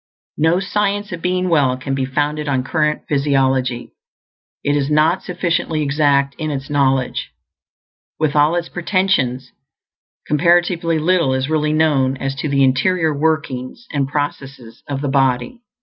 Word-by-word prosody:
No 160 +3 +3
Science 205 +1 -1
of 170 -2 -6
Being 180 +1 0
Well 140 -7 +2
can 135 +1 -4
be 135 -1 -1
founded 150 +3 -2
on 130 -2 0
current 150 +1 0
physiology; 135 -4 0 0.7
it 145 - +1
is 140 -1 0
not 155 +4 +2
sufficiently 170 -3 -1
exact 140 -1 +2
in 155 -1 -2
its 135 -1 -5
knowledge. 135 -3 0 0.9
With 155 -2 0
all 150 +3 +4
its 170 -1 -2
pretensions, 175 -9 0 0.7
comparatively 170 +1 +2
little 165 -4 +2
is 130 +3 -2
really 150 -1 +1
known 145 -4 +2
as 135 0 -3
to 150 - -3
the 140 -1 +2
interior 155 +5 +2
workings 155 - -2
and 140 -2 0
processes 135 -4 -5
of 140 -1 -3
the 145 - -2
body. 135 - 0
145 Hz, 145 wpm, -18 LUFS, 135-165 Hz, 0.9 s, all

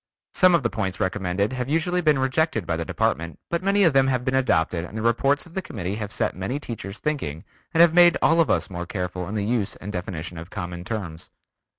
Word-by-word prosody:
Some 185 -1 +5
of 165 - +1
the 120 - +1
points 95 -4 -3
recommended 95 +3 -1
have 130 0 -3
usually 175 +4 +1
been 155 -4 +3
rejected 130 - 0
by 80 - -1
the 80 - -2
Department, 85 0 -1
but 170 0 0
many 200 +1 +3
of 165 -6 +4
them 135 -1 +4
have 125 -2 0
been 130 - 0
adopted 90 -10 +1
and 100 +5 -8
the - - -2
reports 135 +4 +2
of 170 - -16
the 190 - -2
committee 100 - -5
have 105 -2 -5
set 110 -1 -1
many 95 +10 -3
teachers 110 -7 -7
thinking 110 - -3 0.3
and 165 -1 +4
have 170 -1 +6
made 175 -1 +6
us 165 -1 +4 0.2
all - - -13
more 90 0 -5
careful 90 -2 -4
in 105 - -4
the 105 -1 -1
use 110 -3 -1
and 105 - -7
definition 90 -2 -5
of 85 +2 -9
common 90 -3 -6
terms. 90 -5 -5
110 Hz, 230 wpm, -24 LUFS, 90-145 Hz, 0.3 s, have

